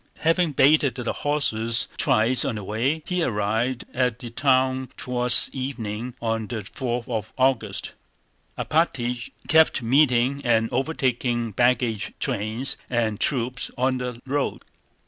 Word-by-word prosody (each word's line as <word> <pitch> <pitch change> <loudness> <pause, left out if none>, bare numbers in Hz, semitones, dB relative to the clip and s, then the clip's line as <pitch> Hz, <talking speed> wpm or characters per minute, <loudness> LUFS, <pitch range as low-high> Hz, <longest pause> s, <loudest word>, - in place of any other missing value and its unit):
Having 165 -1 +2
baited 140 -2 +4
the 125 -3 -3
horses 125 -5 0
twice 115 +4 +4
on 120 - -2
the 105 - -5
way, 125 +10 -1
he 180 -1 -1
arrived 115 0 -1
at 125 -3 0
the 120 -2 -9
town 130 0 +1
toward 125 -1 -1 0.2
evening 125 -3 -5
on 115 -1 -2
the 110 -2 -4
fourth 120 +3 -4
of 110 -3 -4
August. 125 -6 0 0.6
Alpátych 125 -7 0 0.2
kept 160 -4 +4
meeting 130 +1 +3
and 115 -2 +2
overtaking 125 -4 -1
baggage 120 -1 +1
trains 110 +6 -2
and 115 -4 0
troops 125 -2 -1
on 130 +1 +1
the 125 -1 -5
road. 140 +1 -2
125 Hz, 125 wpm, -24 LUFS, 115-135 Hz, 0.6 s, baited